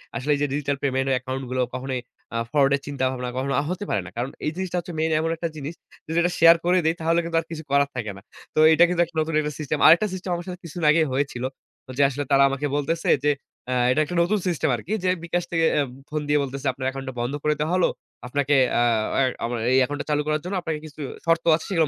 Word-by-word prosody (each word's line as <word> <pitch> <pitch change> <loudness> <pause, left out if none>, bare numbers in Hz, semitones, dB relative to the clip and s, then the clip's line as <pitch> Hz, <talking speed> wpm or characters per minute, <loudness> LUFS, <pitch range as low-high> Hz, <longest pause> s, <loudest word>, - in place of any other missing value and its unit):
আসলে 125 +6 -1
এইযে 145 +1 0
digital 145 -1 -1
payment 135 -1 0
account 130 +1 -4
গুলো 130 0 0
কখনোই 130 0 -3 0.4
আ - - +1
ফ্রড 140 -2 +4
এর - - -3
চিন্তাভাবনা 130 -3 -2
কখনো 135 +1 -1 0.2
হতে 185 +3 -3
পারে - - +1
না। - - -8
কারণ 120 +3 -2 0.2
এই 150 - 0
জিনিসটা 185 -1 -3
হচ্ছে 175 0 -7
মেইন 160 0 +1
এমন 160 +1 0
একটা 170 +1 -3
জিনিস 150 +1 -5 0.3
যদি 160 +1 -2
এটা 175 +1 +1
শেয়ার 165 +1 +8
করে 180 +1 +4
দেই 160 +1 +2
তাহলে 165 +1 +2
কিন্তু 165 0 -1
আর - - -16
কিছু 160 -1 -6
করার 140 0 +3
থাকে 110 -4 -3
না। - - -12 0.3
তো - - +2
এটা 165 +2 +6
কিন্তু 175 -1 +1
একটা 170 0 -21
নতুন 160 +1 -2
একটা 150 0 -3
সিস্টেম। 150 0 -2
আরেকটা 170 +7 +7
সিস্টেম 185 0 -5
আমার 175 0 -6
সাথে 180 -1 -6
কিছুদিন 170 0 -4
আগেই 160 0 +3
হয়েছিল। 130 -2 -2 0.5
যে 145 - +4
আসলে 145 +2 -3
তারা 140 0 +6
আমাকে 135 +2 -2
বলতেছে 150 +3 -1 0.2
যে 150 - +5 0.4
অ্যা 130 - -1 0.2
এটা 155 - +2
একটা 175 - -5
নতুন 205 +5 +1
সিস্টেম 160 -3 0
আরকি। 140 - -5
যে 185 - +2
bKash 170 +1 -2
থেকে 165 -1 +2 0.4
ফোন 150 0 -2
দিয়ে 150 0 +4
বলতেছে, 140 +1 -4
"আপনার 130 0 -4
একাউন্টটা 135 0 -6
বন্ধ 120 +3 -2
করে 150 - +3
দেয়া 155 +2 0
হলো। 185 - +3 0.4
আপনাকে 145 +2 +1 0.2
আ - - +3 0.4
আ - - +4 0.2
আমার 120 +1 -2
এই 130 - +5
একাউন্টটা 145 +2 -5
চালু 150 0 +2
করার 155 0 0
জন্য 185 +3 -4
আপনাকে 160 -3 -3
কিছু 155 0 -10 0.2
শর্ত 165 0 +2
আছে 160 - -6
সেগুলো 165 -5 +2
150 Hz, 240 wpm, -24 LUFS, 135-165 Hz, 0.5 s, শেয়ার